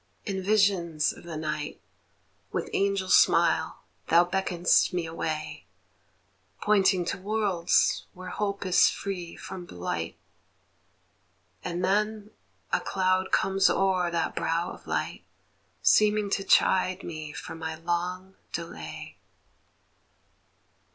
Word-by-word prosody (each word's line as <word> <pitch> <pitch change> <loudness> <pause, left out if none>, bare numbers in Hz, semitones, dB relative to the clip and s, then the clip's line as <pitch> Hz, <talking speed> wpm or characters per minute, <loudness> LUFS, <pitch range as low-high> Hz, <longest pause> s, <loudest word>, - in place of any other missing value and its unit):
In 195 -3 -2
visions 185 -6 +2
of - - -14
the 165 -2 -6
night 150 -1 -4 0.7
With - - -3
angel 195 -1 +1
smile - - +3 0.2
thou 170 +2 +5
beckon'st 180 -1 +2
me 175 -2 -1
away, 155 -4 -4 0.9
Pointing 195 -3 +3
to 180 - -3
worlds 200 -4 +1
where 185 0 -9
hope 200 0 -2
is 185 - +5
free 180 -4 -5
from 185 -2 -8
blight; 90 - -4 1.5
And 180 +1 -2
then 210 +2 0 0.4
a - - +4
cloud 185 0 0
comes 195 0 +3
o'er 185 -2 +2
that 170 -1 -1
brow 165 +2 -1
of - - -13
light, - - -2 0.6
Seeming 210 -1 +4
to 195 - 0
chide 185 0 +3
me 155 -2 -6
for 150 - -7
my 160 -1 -5
long 175 +3 -3 0.2
delay. 80 - -7
180 Hz, 110 wpm, -27 LUFS, 165-195 Hz, 1.5 s, thou